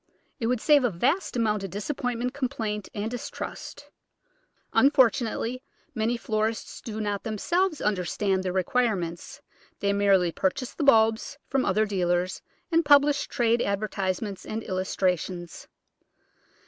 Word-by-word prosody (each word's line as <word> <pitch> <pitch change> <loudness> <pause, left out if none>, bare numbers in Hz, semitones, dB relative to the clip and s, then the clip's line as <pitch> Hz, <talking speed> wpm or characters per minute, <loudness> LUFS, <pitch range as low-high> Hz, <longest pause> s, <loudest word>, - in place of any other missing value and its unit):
It 225 - -1
would 250 0 +1
save 290 +2 +5
a 245 - +3
vast 265 - 0
amount 215 -3 +1
of 195 - -4
disappointment, 245 - -3
complaint, 220 -6 -3
and 215 +2 -3
distrust. 245 - -7 0.8
Unfort 265 -4 +5
unately 235 +2 -3 0.3
many 230 0 0
florists 220 0 -2
do 220 -1 -6
not 205 -2 -2
themselves 325 - 0
understand 195 0 0
their 185 -1 -2
requirements; 185 -3 -1 0.4
they 200 0 +1
merely 195 -3 +3
purchase 195 +9 -2
the 310 - -3
bulbs 225 0 +3
from 270 -1 0
other 215 +1 +2
dealers, 180 -2 0 0.3
and 330 0 +4
publish 285 -1 +4
trade 235 0 +1
advertisements 200 -1 -2
and 220 +1 -5
illustrations. 185 -2 -2
220 Hz, 125 wpm, -26 LUFS, 195-250 Hz, 0.8 s, save